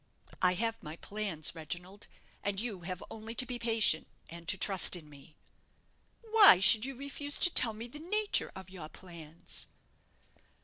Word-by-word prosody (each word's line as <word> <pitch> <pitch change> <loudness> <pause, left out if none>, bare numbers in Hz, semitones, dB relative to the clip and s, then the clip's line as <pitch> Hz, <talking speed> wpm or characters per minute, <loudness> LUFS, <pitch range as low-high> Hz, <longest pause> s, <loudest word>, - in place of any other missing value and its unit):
I 180 0 +3
have 225 +3 -3
my 155 +1 -9
plans, 195 -5 -2
Reginald, 175 +5 -8 0.3
and 200 -1 -3
you 215 -4 -5
have 180 +1 -7
only 225 +1 -9
to 255 - -1
be 245 -1 -6
patient, 225 -8 +2 0.2
and 170 0 -11
to 190 - -1
trust 190 -1 +4
in 165 -4 -12
me." 150 +2 -17 0.9
"But 445 -1 -18
why 410 - +8
should 215 +4 +7
you 270 0 -7
refuse 280 +2 -3
to 355 - +2
tell 230 -3 +3
me 225 +2 -8
the 295 +5 -12
nature 415 +6 -1
of 190 -1 -11
your 165 -5 -10
plans?" 170 -3 -7
200 Hz, 170 wpm, -30 LUFS, 175-240 Hz, 0.9 s, why